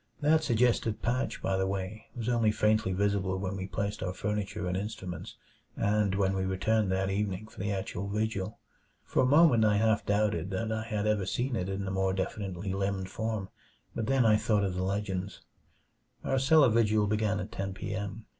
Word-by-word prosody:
That 155 Hz, +1 st, +3 dB
suggestive 120 Hz, -4 st, +2 dB
patch, 125 Hz, +3 st, -1 dB
by 95 Hz, 0 st, +1 dB
the 95 Hz, 0 st, +1 dB
way, 100 Hz, +2 st, -4 dB
was 120 Hz, -2 st, -4 dB
only 115 Hz, -3 st, +3 dB
faintly 105 Hz, -2 st, +2 dB
visible 95 Hz, -1 st, 0 dB
when 95 Hz, 0 st, -3 dB
we 95 Hz, -1 st, -4 dB
placed 100 Hz, +1 st, -3 dB
our 90 Hz, -1 st, -2 dB
furniture 105 Hz, 0 st, -2 dB
and 90 Hz, -, -1 dB
instruments, 95 Hz, -2 st, -5 dB, 0.4 s
and 105 Hz, -1 st, +1 dB
when 95 Hz, -1 st, +1 dB
we 95 Hz, -, 0 dB
returned 95 Hz, +2 st, +1 dB
that 95 Hz, 0 st, 0 dB
evening 100 Hz, 0 st, -2 dB
for 110 Hz, -, -15 dB
the 100 Hz, +1 st, -1 dB
actual 95 Hz, 0 st, -3 dB
vigil. 105 Hz, -2 st, -2 dB, 0.5 s
For -, -, +1 dB
a 125 Hz, -, +3 dB
moment 145 Hz, -5 st, +6 dB
I 105 Hz, -1 st, +4 dB
half 110 Hz, 0 st, +2 dB
doubted 105 Hz, -2 st, 0 dB
that 110 Hz, +4 st, -2 dB
I 110 Hz, 0 st, -1 dB
had 105 Hz, -2 st, -2 dB
ever 105 Hz, -3 st, +1 dB
seen 125 Hz, +4 st, -1 dB
it 95 Hz, -3 st, -2 dB
in 95 Hz, 0 st, -3 dB
the 95 Hz, -, -3 dB
more 95 Hz, 0 st, +1 dB
definitely 95 Hz, 0 st, -3 dB
limned 95 Hz, -1 st, -2 dB
form 110 Hz, -3 st, -3 dB, 0.4 s
but 115 Hz, -2 st, -3 dB
then 135 Hz, -2 st, +3 dB
I 110 Hz, -1 st, +6 dB
thought 105 Hz, -1 st, +1 dB
of 95 Hz, -2 st, 0 dB
the 90 Hz, -, -2 dB
legends. 95 Hz, 0 st, -3 dB, 0.8 s
Our 135 Hz, -, +1 dB
cellar 140 Hz, +1 st, +6 dB
vigil 110 Hz, -2 st, +3 dB
began 105 Hz, 0 st, 0 dB
at -, -, -5 dB
ten 95 Hz, 0 st, -3 dB
p. 105 Hz, -, -4 dB
m. 105 Hz, +2 st, -5 dB
105 Hz, 195 wpm, -30 LUFS, 95-110 Hz, 0.8 s, moment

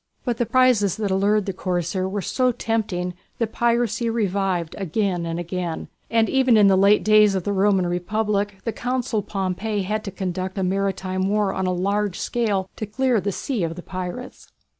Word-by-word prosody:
But 240 Hz, -3 st, -1 dB
the 240 Hz, -, 0 dB
prizes 245 Hz, -7 st, +3 dB
that 210 Hz, -3 st, -1 dB
allured 200 Hz, +2 st, +2 dB
the 195 Hz, -, -3 dB
corsair 180 Hz, 0 st, -2 dB
were 200 Hz, 0 st, -3 dB
so 255 Hz, -1 st, +1 dB
tempting, 215 Hz, -7 st, -2 dB, 0.2 s
that 225 Hz, -2 st, -1 dB
piracy 235 Hz, -1 st, +1 dB
revived 195 Hz, -6 st, -1 dB
again 185 Hz, -2 st, -1 dB
and 165 Hz, +1 st, -3 dB
again, 175 Hz, -1 st, -4 dB, 0.2 s
and 225 Hz, -1 st, +3 dB
even 260 Hz, -4 st, +4 dB
in 210 Hz, -, +6 dB
the 195 Hz, -1 st, +6 dB
late 200 Hz, +2 st, +5 dB
days 215 Hz, -2 st, +5 dB
of 190 Hz, -, -1 dB
the 200 Hz, -, -1 dB
Roman 195 Hz, -1 st, +3 dB
Republic 205 Hz, +3 st, -1 dB
the 230 Hz, -, -2 dB
Consul 250 Hz, -3 st, -1 dB
Pompey 195 Hz, +2 st, -2 dB
had 215 Hz, +3 st, -2 dB
to -, -, -3 dB
conduct 185 Hz, 0 st, -4 dB
a 190 Hz, -, 0 dB
maritime 190 Hz, 0 st, -1 dB
war 205 Hz, -2 st, +1 dB
on 190 Hz, -1 st, -1 dB
a -, -, +1 dB
large 200 Hz, +2 st, 0 dB
scale 205 Hz, -6 st, -1 dB
to 215 Hz, -, -4 dB
clear 245 Hz, +1 st, +1 dB
the 200 Hz, +2 st, -1 dB
sea 235 Hz, 0 st, -2 dB
of 165 Hz, 0 st, -2 dB
the 180 Hz, -, -9 dB
pirates. 185 Hz, +7 st, -7 dB
200 Hz, 185 wpm, -23 LUFS, 185-220 Hz, 0.2 s, in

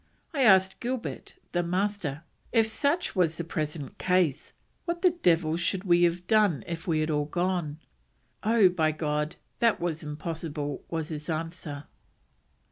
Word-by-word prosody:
I 280 Hz, -, 0 dB
asked 190 Hz, -5 st, +5 dB
Gilbert 245 Hz, 0 st, -4 dB, 0.2 s
[the 175 Hz, -, +1 dB
Master], 180 Hz, -4 st, -1 dB, 0.3 s
if 225 Hz, -2 st, +4 dB
such 285 Hz, +11 st, 0 dB
was 165 Hz, -3 st, +2 dB
the 170 Hz, -, -2 dB
present 155 Hz, -3 st, -4 dB
case, 180 Hz, -6 st, +1 dB, 0.3 s
what 340 Hz, 0 st, -3 dB
the 365 Hz, -, +6 dB
devil 165 Hz, -, +2 dB
should 180 Hz, +2 st, -1 dB
we 175 Hz, -3 st, +4 dB
have 175 Hz, +1 st, -1 dB
done 210 Hz, -9 st, +3 dB
if 170 Hz, 0 st, -6 dB
we 160 Hz, -2 st, +2 dB
had 155 Hz, +1 st, 0 dB
all 150 Hz, -1 st, +1 dB
gone? 175 Hz, -1 st, -1 dB, 0.6 s
'Oh, 220 Hz, -2 st, +5 dB
by 160 Hz, -3 st, +1 dB
God, 150 Hz, 0 st, -1 dB, 0.2 s
that 230 Hz, -4 st, +3 dB
was 170 Hz, -2 st, -2 dB
impossible,' 150 Hz, -1 st, -4 dB
was 160 Hz, -2 st, -3 dB
his 150 Hz, -1 st, -6 dB
answer." 160 Hz, -2 st, -4 dB
170 Hz, 150 wpm, -28 LUFS, 155-195 Hz, 0.6 s, the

